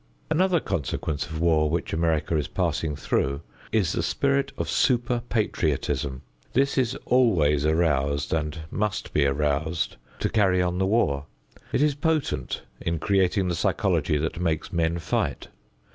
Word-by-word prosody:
Another 180 +2 +3
consequence 75 - -2
of 80 +1 -5
war 80 -2 +3
which 85 +3 -2
America 80 0 +1
is 75 -1 0
passing 80 -2 -1
through 70 -1 -1 0.3
is 105 -7 +2
the - - -1
spirit 140 0 +1
of - - -2
super 120 -1 +1
patriotism. 75 - -1 0.3
This 135 +2 +2
is 130 -1 +1
always 80 - +3
aroused 70 -3 +1
and 80 0 -2
must 105 -1 -2
be 70 -2 +3
aroused 75 +3 0 0.2
to - - +2
carry 95 -4 +3
on 90 0 0
the 95 - +2
war. 75 -10 +1 0.4
It 145 - +2
is 150 -1 +3
potent 155 +1 -1 0.2
in 85 0 -1
creating 95 +2 +2
the 90 - 0
psychology 75 -2 +1
that 80 +3 -2
makes 80 -2 -1
men 85 0 +1
fight. 80 - -2
85 Hz, 145 wpm, -25 LUFS, 75-110 Hz, 0.4 s, Another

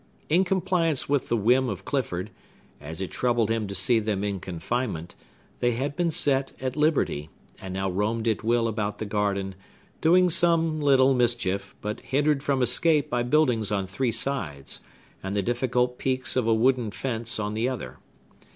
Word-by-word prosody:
In 175 +5 +4
compliance 180 -5 0
with 140 -4 0
a - - +4
whim 125 +4 +3
of 100 - -6
Clifford, 115 -10 -2 0.5
as 80 +4 -7
it 95 - -4
troubled 120 -3 +1
him 115 -2 -1
to 100 - -5
see 115 +5 +3
them 105 -2 -2
in 100 -2 -2
confinement, 90 0 -3 0.5
they 120 0 +2
had 135 +4 -2
been 175 +1 +1
set 140 -3 +1
at 130 -1 -3
liberty, 150 - +1 0.3
and 95 -1 -6
now 95 0 -1
roamed 105 +5 -1
at 110 -1 0
will 115 +1 +2
about 105 -2 -2
the 110 - -4
garden; 100 -2 -1 0.5
doing 180 +3 +5
some 165 -2 +2
little 135 -2 +5
mischief, 115 -6 0
but 105 +1 -4
hindered 145 +1 +1
from 140 -3 +1
escape 150 +4 +2
by 120 - +1
buildings 125 -5 +2
on 100 -2 0
three 115 +6 -1
sides, 80 - -3 0.4
and 95 +1 -4
the 100 - +1
difficult 125 +2 0
peaks 130 -1 0
of 125 -3 +1
a - - +4
wooden 125 0 +2
fence 115 0 -3
on 105 0 -2
the 115 +4 0
other. 65 - -6
120 Hz, 175 wpm, -26 LUFS, 105-135 Hz, 0.5 s, doing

